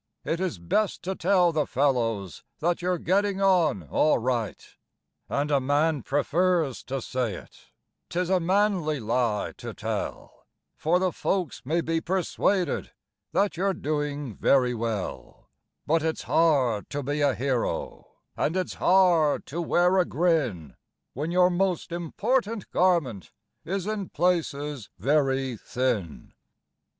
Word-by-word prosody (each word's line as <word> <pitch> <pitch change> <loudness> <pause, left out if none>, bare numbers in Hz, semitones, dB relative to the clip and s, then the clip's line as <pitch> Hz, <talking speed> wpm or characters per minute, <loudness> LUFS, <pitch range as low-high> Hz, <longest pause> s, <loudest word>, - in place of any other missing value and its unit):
It 165 - -1
is 185 - -2
best 190 - -1
to 190 - -2
tell 180 -1 +3
the 155 -2 0
fellows 115 - 0
that 175 +2 0
you're 180 0 0
getting 195 +4 +1
on 175 - +3
all 150 - +2
right. 120 -3 -1 0.7
And 145 +1 -1
a 140 - +4
man 145 +2 +1
prefers 160 +1 +1
to 135 -1 -4
say 125 -6 -2
it - - -14 0.4
'tis 180 +2 -1
a 185 - +4
manly 180 -4 +1
lie 115 -2 0
to - - -7
tell, - - -5 0.3
For 165 +3 +2
the 185 0 +1
folks 180 -5 -2
may 160 +6 0
be 165 0 -1
persuaded 185 -1 0 0.4
that 195 0 +1
you're 195 +1 +1
doing 145 -4 -3
very 125 +3 +3
well; 115 -4 -5 0.3
But 165 +2 +2
it's 160 0 -2
hard 135 -10 +2
to 145 0 -3
be 145 +3 -2
a 140 -3 +3
hero, 130 -2 -2 0.3
and 165 +5 0
it's 185 - -2
hard 175 -5 +3
to 170 +5 -4
wear 175 +3 +3
a 180 - +3
grin, 140 - 0 0.4
When 150 +6 -3
your 180 +1 +4
most 180 -1 0
important 210 +6 -1
garment 165 - +1 0.3
is 190 +1 -3
in 210 -3 -3
places 150 - -1
very 135 - +1
thin. 115 - -3
155 Hz, 135 wpm, -26 LUFS, 130-180 Hz, 0.7 s, a